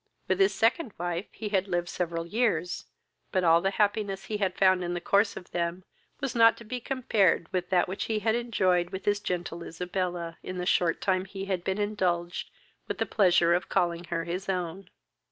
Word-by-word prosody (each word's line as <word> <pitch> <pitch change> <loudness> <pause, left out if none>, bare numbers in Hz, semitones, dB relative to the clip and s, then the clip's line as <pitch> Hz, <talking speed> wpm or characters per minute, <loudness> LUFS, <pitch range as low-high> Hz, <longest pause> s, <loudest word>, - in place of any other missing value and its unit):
With - - +1
his 390 0 +5
second 235 - +1
wife 175 +2 -3
he 215 - -5
had 195 -1 +1
lived 175 -2 -1
several 170 -1 -2
years; 180 -4 0 0.5
but 185 - +1
all 165 0 +5
the 195 - +2
happiness 205 -1 0
he 215 - -2
had 190 -3 -1
found 185 -1 +4
in 175 0 -2
the - - -1
course 200 +4 +2
of 180 - -10
them 170 +1 -2 0.4
was 270 -3 -2
not 230 -1 +6
to - - -11
be 245 +3 -4
compared 220 -10 +1
with 180 -1 -1
that 180 -2 +3
which 190 +2 -3
he 220 - -1
had 220 +1 +1
enjoyed 185 -7 +1
with 190 +1 -6
his 205 0 +2
gentle 175 -3 -3
Isabella, 175 0 -4
in 185 - -6
the 180 - -2
short 175 -2 +2
time 185 -1 +1
he 195 0 -6
had 190 -3 -2
been 190 +1 -1
indulged 185 -5 -1 0.4
with - - -3
the - - 0
pleasure 175 -4 +4
of 175 - 0
calling 170 0 0
her 170 -1 -2
his 180 +3 -4
own. 180 0 -3
185 Hz, 205 wpm, -28 LUFS, 175-205 Hz, 0.5 s, not